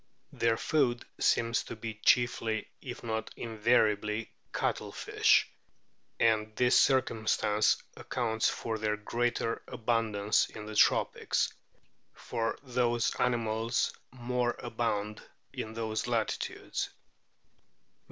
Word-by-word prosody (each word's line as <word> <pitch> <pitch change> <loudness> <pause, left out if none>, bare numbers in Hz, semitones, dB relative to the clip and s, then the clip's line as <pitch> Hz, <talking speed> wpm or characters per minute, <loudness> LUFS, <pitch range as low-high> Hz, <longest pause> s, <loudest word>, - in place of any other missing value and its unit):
Their 115 -1 +2
food 120 -6 +1
seems 115 0 +2
to - - -7
be 110 0 -5
chiefly, 110 0 +2
if 120 -3 -7
not 110 -1 -2
invariably, 110 -1 +1 0.2
cuttlefish; - - +2 0.7
and 110 -1 +2
this 125 0 +3
circumstance 110 -5 +2 0.2
accounts 110 -3 0
for 110 -1 -3
their 105 0 0
greater 115 +1 -1
abundance 110 -3 +1
in 105 - -9
the 110 - -7
tropics, 105 - +2 0.6
for 115 0 -2
those 120 -2 +1
animals 115 -1 +1 0.2
more 125 -1 -1
abound 110 -3 -2 0.3
in 110 0 -5
those 110 0 -2
latitudes. 115 -3 -2
115 Hz, 95 wpm, -30 LUFS, 110-120 Hz, 0.7 s, this